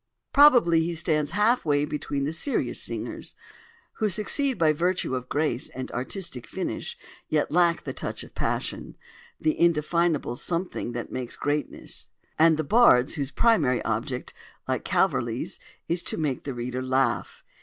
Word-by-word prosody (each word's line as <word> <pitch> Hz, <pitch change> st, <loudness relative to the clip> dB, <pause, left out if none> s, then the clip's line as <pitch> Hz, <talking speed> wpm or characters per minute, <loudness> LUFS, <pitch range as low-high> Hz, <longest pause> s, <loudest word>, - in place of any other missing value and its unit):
Probably 245 Hz, -, +6 dB
he 170 Hz, +1 st, -2 dB
stands 155 Hz, -1 st, 0 dB
half 215 Hz, +5 st, +3 dB
way 145 Hz, -1 st, +2 dB
between 145 Hz, -2 st, -3 dB
the 145 Hz, -, -1 dB
serious 270 Hz, -, 0 dB
singers—who 460 Hz, -, -6 dB
succeed 255 Hz, -, +2 dB
by 155 Hz, -2 st, +4 dB
virtue 175 Hz, -2 st, 0 dB
of 125 Hz, -1 st, -4 dB
grace 150 Hz, +1 st, 0 dB
and 130 Hz, 0 st, -7 dB
artistic 130 Hz, -, -4 dB
finish, 330 Hz, -, -4 dB, 0.3 s
yet 155 Hz, -1 st, +1 dB
lack 170 Hz, 0 st, +3 dB
the -, -, -5 dB
touch -, -, -5 dB
of -, -, -14 dB
passion, -, -, -3 dB, 0.4 s
the 315 Hz, 0 st, 0 dB
indefinable 170 Hz, -4 st, +2 dB
something 170 Hz, -5 st, -3 dB
that 120 Hz, -1 st, -5 dB
makes 125 Hz, -2 st, -4 dB
greatness—and 150 Hz, +2 st, -1 dB
the 155 Hz, -, 0 dB
bards 140 Hz, -, +5 dB
whose 140 Hz, -4 st, -2 dB
primary 150 Hz, -, +2 dB
object, 120 Hz, +3 st, -3 dB, 0.3 s
like -, -, -1 dB
Calverley's, -, -, 0 dB, 0.3 s
is 170 Hz, +1 st, 0 dB
to -, -, -3 dB
make 145 Hz, -5 st, -2 dB
the 140 Hz, -, -3 dB
reader 125 Hz, +1 st, -3 dB
laugh. 130 Hz, -2 st, 0 dB
155 Hz, 145 wpm, -26 LUFS, 135-180 Hz, 0.4 s, Probably